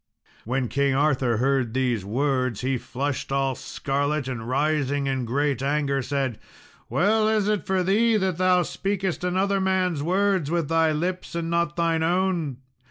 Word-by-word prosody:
When 125 +2 -1
King 140 +1 +1
Arthur 135 -5 +2
heard 130 -1 0
these 125 -6 0
words 125 +1 -1
he 130 0 0
flushed 135 +3 -4
all 135 -1 +1
scarlet, 140 +2 -2
and 120 -3 -5
rising 145 0 0
in 130 -2 -1
great 140 +3 0
anger 140 0 0
said, 130 -3 -2 0.5
"Well 215 +4 +2
is 215 -2 +1
it 210 -3 -1
for 190 -1 +1
thee 220 +4 +3
that 190 -4 -1
thou 185 -1 +4
speakest 190 0 -2
another 190 +2 +1
man's 185 -5 +1
words 185 -1 +1
with 170 -3 -1
thy 165 -1 +3
lips, 180 +4 -3
and 165 0 -2
not 170 0 0
thine 165 -1 +1
own. 170 -5 0
150 Hz, 160 wpm, -24 LUFS, 135-185 Hz, 0.5 s, thou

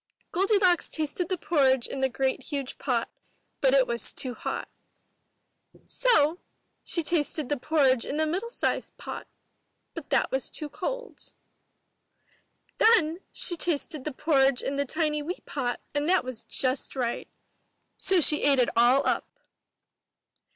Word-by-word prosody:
Goldilocks 380 -1 +3
tasted 315 +3 -2
the 370 - 0
porridge 265 -7 +2
in 270 - -4
the 265 - +2
great 265 +1 -1
huge 275 -2 -4
pot, - - 0 0.5
but 270 -1 +3
it 265 -2 +5
was 235 -1 +1
too 255 -2 -2
hot. - - -4 1.2
So 360 -10 +2 0.4
she 335 - -1
tasted 305 -3 -1
the 290 - +1
porridge 265 -2 +2
in 290 - -3
the 315 - +2
middle 370 +9 -2
sized - - -2
pot, - - -7 0.7
but - - -8
that - - +2
was 265 0 -1
too 300 - -5
cold. - - -6 1.5
Then 355 -8 +4
she 350 - +1
tasted 310 -4 -1
the 305 - -3
porridge 270 -3 +2
in 275 - -2
the 280 0 0
tiny 300 +1 0
wee 340 +5 -5
pot 245 -4 -3
and 290 +2 0
that 370 -5 +4
was 255 -3 -6
just 260 +1 -2
right. 245 -3 -2 0.7
So 380 -2 +2
she 300 0 +3
ate 280 -1 +4
it 250 -2 +3
all 240 +4 +4
up! - - 0
295 Hz, 145 wpm, -27 LUFS, 265-340 Hz, 1.5 s, it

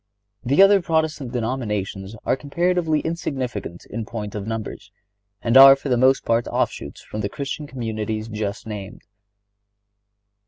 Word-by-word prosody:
The 140 +9 +5
other 195 0 +6
Protestant 160 -6 -1
denominations 105 -5 -3
are - - +2
comparatively 165 +2 0
insignificant 135 - -4
in 115 +1 -5
point 105 -2 -6
of 105 -1 -5
numbers, 110 -2 -5 0.5
and 115 +1 +1
are 135 0 +11
for 140 +1 -6
the 125 - +3
most 130 +2 +3
part 115 +1 +1
offshoots - - -3
from 105 - -6
the 100 - -2
Christian 145 +2 -5
communities 110 -4 -4
just 105 -2 -4
named. 105 -3 -7
120 Hz, 135 wpm, -22 LUFS, 105-140 Hz, 0.5 s, are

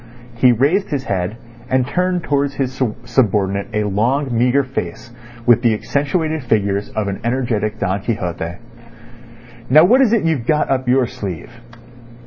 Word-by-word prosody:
He 125 +1 +5
raised 145 - +1
his 140 -3 -2
head, 95 -1 -2 0.3
and 130 0 +2
turned 180 +3 -1
towards 140 -2 0
his 130 -1 -3 0.2
subordinate 100 -5 +1
a 105 -1 0
long, 120 +6 0
meagre 125 +4 +3
face 120 -4 -6 0.3
with 120 -1 +5
the 115 -3 +3
accentuated 155 +5 -1
features 100 -4 0
of 110 -2 -1
an 100 -1 -4
energetic 115 -3 -1
Don 100 -1 -1
Quixote. 90 -6 -3 1.1
"Now 155 +5 +7
what 245 +9 +5
is 250 -5 +4
it 230 -3 +2
you've 155 -8 -1
got 150 -2 +1
up 130 -1 0
your 130 0 +3
sleeve?" 105 -6 -7
125 Hz, 150 wpm, -18 LUFS, 105-140 Hz, 1.1 s, Now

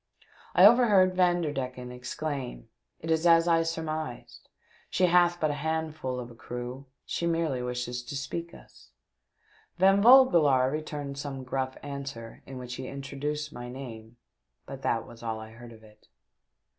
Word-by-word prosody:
I 180 - +8
overheard 205 -5 +6
Vanderdecken 145 -9 0
exclaim, 125 - -5 0.2
*' - - -51
It 165 - -3
is 160 +2 +2
as 165 0 +6
I 165 -1 +4
surmised; 160 -5 -5 0.4
she 185 - +2
hath 175 0 +4
but 155 -1 +1
a 145 -1 -5
handful 155 -5 -2
of 120 -1 -7
a - - -14
crew; 125 +3 -7 0.2
she 170 - -2
merely 165 -6 0
wishes 125 0 -3
to 145 - -6
speak 165 +5 -4
us." - - -17 0.9
Van 195 +2 +5
Vogelaar 170 - +6
returned 145 -2 -5
some 135 -2 -5
gruff 130 0 -3
answer 140 -5 -7
in 135 - -8
which 125 -1 -7
he 130 0 -6
introduced 145 +2 -4
my 120 0 -7
name, 120 -3 -9 0.5
but - - -8
that - - 0
was 115 - -13
all 110 -1 -3
I 110 0 -10
heard 120 +1 -12
of 110 -1 -15
it. 105 -1 -20
140 Hz, 155 wpm, -28 LUFS, 125-165 Hz, 0.9 s, I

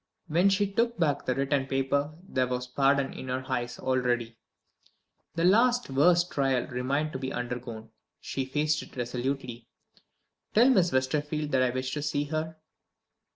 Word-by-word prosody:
When 175 +5 +3
she 200 +1 +2
took 230 +4 0
back 145 -5 0
the 125 - +1
written 135 0 0
paper 140 +3 0
there 130 -6 0
was 125 0 -2
pardon 135 +2 +1
in 130 - -8
her 130 +1 -3
eyes 120 -2 -2
already. 120 -3 0 1.0
The 165 - 0
last 240 - +3
worst 175 +5 +4
trial 135 -4 +1
remained 135 +5 -1
to 130 - -4
be 130 0 -4
undergone; 120 -2 -5 0.3
she 135 - -3
faced 150 +3 0
it - - -13
resolutely. 125 -1 -3 0.9
"Tell 240 +5 +6
Miss 185 -8 +3
Westerfield 150 +3 -1
that 130 - +3
I 130 - +3
wish 130 +1 -3
to 150 - -2
see 145 0 -1
her." 155 +2 -4
135 Hz, 155 wpm, -28 LUFS, 130-155 Hz, 1.0 s, Tell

